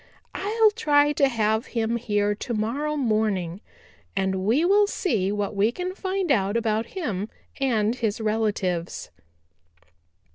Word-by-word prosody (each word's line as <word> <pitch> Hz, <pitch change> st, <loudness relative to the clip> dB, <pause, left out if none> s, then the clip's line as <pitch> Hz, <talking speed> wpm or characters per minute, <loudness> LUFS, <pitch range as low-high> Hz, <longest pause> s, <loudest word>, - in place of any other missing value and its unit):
I'll 430 Hz, +3 st, +3 dB
try 295 Hz, -9 st, +3 dB
to 280 Hz, -1 st, +3 dB
have 220 Hz, -2 st, 0 dB
him 230 Hz, +1 st, +1 dB
here 205 Hz, -3 st, 0 dB
to 235 Hz, +4 st, -5 dB
morrow 280 Hz, +8 st, -1 dB
morning 215 Hz, -, 0 dB, 0.5 s
and 190 Hz, -1 st, 0 dB
we 245 Hz, -, +3 dB
will 405 Hz, +2 st, +5 dB
see 215 Hz, -, 0 dB
what 205 Hz, 0 st, -2 dB
we 205 Hz, +3 st, +3 dB
can 360 Hz, +7 st, -4 dB
find 380 Hz, -3 st, -2 dB
out 200 Hz, -2 st, +2 dB
about 225 Hz, 0 st, 0 dB
him 215 Hz, -, -2 dB, 0.3 s
and 230 Hz, -5 st, +1 dB
his 225 Hz, -4 st, -2 dB
relatives." 210 Hz, -6 st, -1 dB
225 Hz, 135 wpm, -25 LUFS, 205-290 Hz, 0.5 s, will